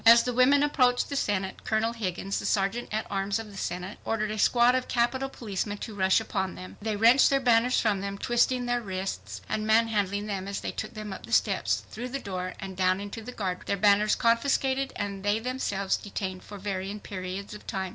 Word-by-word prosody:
As 230 +1 +8
the 250 - -2
women 275 +4 +5
approached 255 -4 +2
the 280 - -3
Senate, 195 -7 -1
Colonel 225 +1 0
Higgins, 195 -3 -3
the - - -6
Sergeant 205 +4 0
at 215 +1 -1
Arms 195 +1 0
of 225 -2 -7
the - - -12
Senate, 180 +1 -4
ordered 215 -1 -1
a 215 - -4
squad 240 +3 +5
of 255 0 0
Capitol 255 +3 0
policemen 205 -4 -4
to 220 - -6
rush 190 0 +3
upon 190 -4 -3
them. 185 - -10
They 215 0 -1
wrenched 230 +6 +6
their 275 - +3
banners 245 0 +3
from 205 -4 +1
them, 200 0 -4
twisting 245 +3 +1
their 245 0 0
wrists 185 - -5
and 215 0 -2
manhandling 210 -3 +2
them 195 -2 -4
as 200 - -4
they - - -3
took - - -6
them 215 -2 -5
up 115 - -9
the - - -11
steps, 110 -1 +2
through 245 +4 -5
the 270 - -3
door, 185 -6 -5
and 195 -2 -6
down 185 0 +2
into 205 +3 -6
the 235 +3 -7
guardroom,—their 195 -2 -2
banners 205 +2 +4
confiscated 265 +3 +1
and 200 -1 -4
they 205 +1 +2
themselves 225 -5 -1
detained 190 -2 -5
for 205 - -9
varying 195 +1 -4
periods 190 +1 -6
of 210 - -11
time. 190 -1 -2
210 Hz, 210 wpm, -28 LUFS, 195-235 Hz, -, As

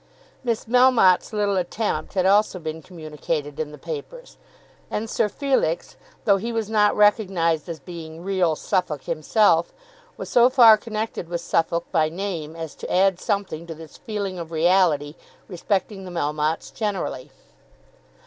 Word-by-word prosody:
Miss 230 -3 -1
Melmotte's 245 -6 +4
little 205 -2 0
attempt 205 +4 -2
had 185 -1 +2
also 200 0 +3
been 160 -1 -6
communicated 155 -3 -5
in 155 -1 -3
the 150 - -10
papers; - - -8 0.5
and 220 +2 -3
Sir 215 - 0
Felix, 260 - -1 0.3
though 200 -2 +5
he 230 +5 -4
was 225 -2 -3
not 210 -1 +3
recognised 185 -6 +2
as 165 -2 -5
being 165 +1 -9
"real 185 -4 +1
Suffolk" 150 -4 -2
himself, 170 +2 +2 0.4
was - - -6
so 245 0 +5
far 240 -4 +8
connected 215 -5 -5
with 170 -1 -3
Suffolk 170 0 0
by 155 -3 +2
name 165 -3 -5
as 165 -2 -6
to - - -8
add 190 0 +3
something 200 -6 -3
to 165 - -7
this 160 -1 -12
feeling 200 -4 -4
of 165 -1 -7
reality 160 -3 +2 0.3
respecting 195 +1 -2
the 185 - -8
Melmottes 155 -1 -2
generally. 195 - -3
185 Hz, 150 wpm, -23 LUFS, 160-210 Hz, 0.5 s, far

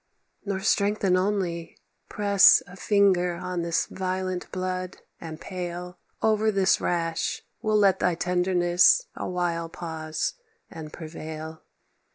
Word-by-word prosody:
"Nor 195 -2 -2
strengthen 200 -1 +2
only; 185 -3 -1 0.3
press 200 -2 +5
A 180 - -13
finger 190 -3 +2
on 180 0 -4
this 170 -1 0
violent 185 -1 -4
blood 185 0 -4 0.2
and 160 -1 -8
pale, 180 -1 -6 0.2
Over 220 0 +3
this 195 -2 +2
rash 165 -2 -1 0.2
will 215 -1 +2
let 200 -2 +4
thy 180 -2 +1
tenderness 180 - +3
A - - -4
while 170 -2 -2
pause, 160 - -4 0.4
and 155 -2 -8
prevail. 160 0 -8
180 Hz, 120 wpm, -26 LUFS, 170-195 Hz, 0.4 s, press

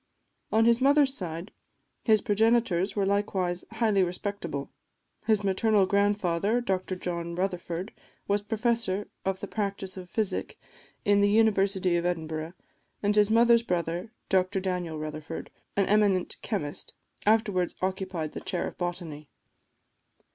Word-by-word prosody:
On 225 +1 +4
his 235 +1 +4
mother's 280 0 +5
side 175 -3 -5 0.5
his 215 -2 +4
progenitors 215 -4 +2
were 200 -2 +1
likewise 190 -3 0
highly 220 -4 +2
respectable: 175 -5 -3 0.6
his 215 -2 +3
maternal 200 +1 +3
grandfather, 200 +1 +1
Dr 190 -5 -1
John 170 -1 -4
Rutherford, 180 +1 -3 0.3
was 205 0 +2
Professor 220 -2 -1 0.2
of 190 0 -1
the 200 - -4
Practice 200 -3 -3
of 180 -1 -8
Physic 215 -1 -2 0.5
in 205 0 +4
the 205 - +4
University 200 -4 +3
of 170 - -1
Edinburgh, 160 -1 -3 0.5
and 205 +1 +2
his 210 -1 +5
mother's 235 +1 +5
brother, 175 -1 -2 0.2
Dr 190 +1 +2
Daniel 180 -4 -2
Rutherford, 155 +1 -6 0.2
an 200 - +3
eminent 205 -3 +2
chemist, 160 -9 -4 0.3
afterwards 210 -5 +2
occupied 185 -4 -2
the - - -7
chair 180 -3 -2
of - - -7
Botany. 170 -4 -4
195 Hz, 130 wpm, -28 LUFS, 175-210 Hz, 0.6 s, mother's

